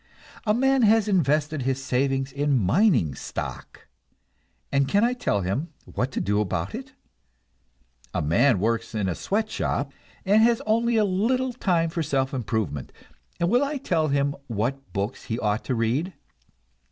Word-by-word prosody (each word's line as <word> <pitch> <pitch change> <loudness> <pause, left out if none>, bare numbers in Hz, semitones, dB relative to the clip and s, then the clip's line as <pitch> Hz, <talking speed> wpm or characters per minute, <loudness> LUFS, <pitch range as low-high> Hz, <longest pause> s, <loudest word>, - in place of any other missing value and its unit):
A 210 - +4
man 265 +2 +3
has 220 -1 +4
invested 155 -5 +1
his 135 +1 -1
savings 135 +1 0
in 140 0 +1
mining 115 - +3
stock, - - -7 0.8
and 140 -1 +2
can 205 +9 +3
I 240 +1 +3
tell 170 - 0
him 105 - -2 0.2
what 125 +2 -3
to - - -1
do 105 +1 +1
about 85 -4 -2
it? 260 +2 -7 1.2
A - - -1
man 95 - +3
works 115 +2 -1
in 105 -3 0
a 90 - 0
sweatshop, 195 - -2 0.3
and 205 +3 +5
has 230 0 +4
only 230 +2 +2
a 215 - +4
little 245 +7 0
time 170 -8 +1
for 165 - -2
self 140 -2 0
improvement, 110 - -2 0.5
and 170 - +2
will 245 +4 +4
I 285 +1 -2
tell 165 - 0
him 140 0 +1
what 125 +5 -3
books 100 +4 -3
he 115 - -2
ought 105 -1 -1
to 130 - -1
read? 120 +11 0
140 Hz, 160 wpm, -25 LUFS, -, 1.2 s, and